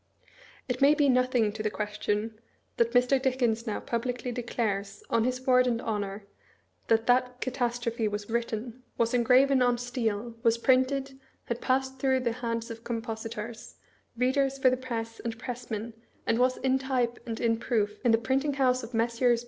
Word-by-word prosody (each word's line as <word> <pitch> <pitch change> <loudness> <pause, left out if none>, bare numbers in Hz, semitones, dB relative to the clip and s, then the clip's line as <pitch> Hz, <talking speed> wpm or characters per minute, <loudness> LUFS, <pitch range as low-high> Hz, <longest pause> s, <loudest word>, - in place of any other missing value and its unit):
It 250 0 -3
may 285 +2 +6
be 295 -2 +3
nothing 250 -4 +3
to 215 +1 -6
the 215 - 0
question 210 +1 -3 0.4
that 235 0 +2
Mr. 250 +2 +4
Dickens 245 -3 0
now 215 - -1
pub 235 -1 -2
licly 245 0 -3
declares, 210 -5 -3
on 230 -1 +3
his 255 +1 -2
word 255 -1 +5
and 235 -2 +1
honor, 205 -3 -3 0.6
that 225 0 +3
that 250 0 +2
catastrophe 240 -2 -1
was 205 0 -4
written, 235 +1 -3 0.2
was 230 0 +1
engraven 255 +2 +4
on 245 -1 +3
steel, 235 -2 -2
was 230 -1 +3
printed, 265 +2 +1 0.3
had 235 0 -3
passed 265 0 0
through 260 -1 +2
the 240 -2 0
hands 230 0 -3
of 230 0 -9
compositors, 225 -1 -5 0.4
readers 270 +2 +1
for 260 -1 +4
the - - +2
press, 230 -3 -5
and 230 -1 -4
pressmen, 235 -2 -5 0.3
and 230 - +1
was 255 +1 +3
ia 265 0 +3
type 255 -3 -1
and 225 -1 -4
in 230 -1 +2
proof 215 -4 -1
in 240 - +4
the 225 - +5
Print 260 +4 0
ing 290 - 0
House 255 -2 +2
of 230 0 -7
Messes. 235 +1 +2
240 Hz, 175 wpm, -28 LUFS, 225-255 Hz, 0.6 s, may